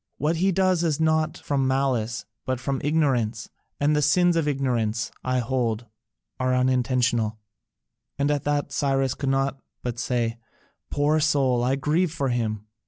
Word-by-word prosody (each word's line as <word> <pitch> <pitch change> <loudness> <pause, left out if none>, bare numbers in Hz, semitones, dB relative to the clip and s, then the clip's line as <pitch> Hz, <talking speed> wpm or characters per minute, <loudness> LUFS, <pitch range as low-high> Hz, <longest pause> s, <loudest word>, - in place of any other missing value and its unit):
What 155 +3 0
he 190 +3 +2
does 185 -2 +2
is 160 -3 0
not 160 0 +2
done - - -14
from 135 -2 0
malice, 125 -5 0 0.2
but 130 -1 -2
from 135 +1 -2
ignorance; 130 -8 0 0.3
and 145 +1 +2
the 150 - +2
sins 175 +4 +4
of 165 -3 +1
ignorance, 120 -6 0
I 130 0 0
hold, 120 -2 -1 0.5
are 130 0 +1
unintentional.'" 125 -3 +1 0.8
And 140 +1 +1
at 145 -2 0
that 145 0 0
Cyrus 135 -2 +1
could 140 - -3
not 135 0 0 0.2
but 120 -1 -3
say: 120 -2 -1 0.5
"Poor 150 +2 +2
soul! 135 -5 +2
I 130 +2 +2
grieve 155 +5 +1
for 140 -5 -1
him." 110 -4 -2
135 Hz, 160 wpm, -25 LUFS, 120-150 Hz, 0.8 s, sins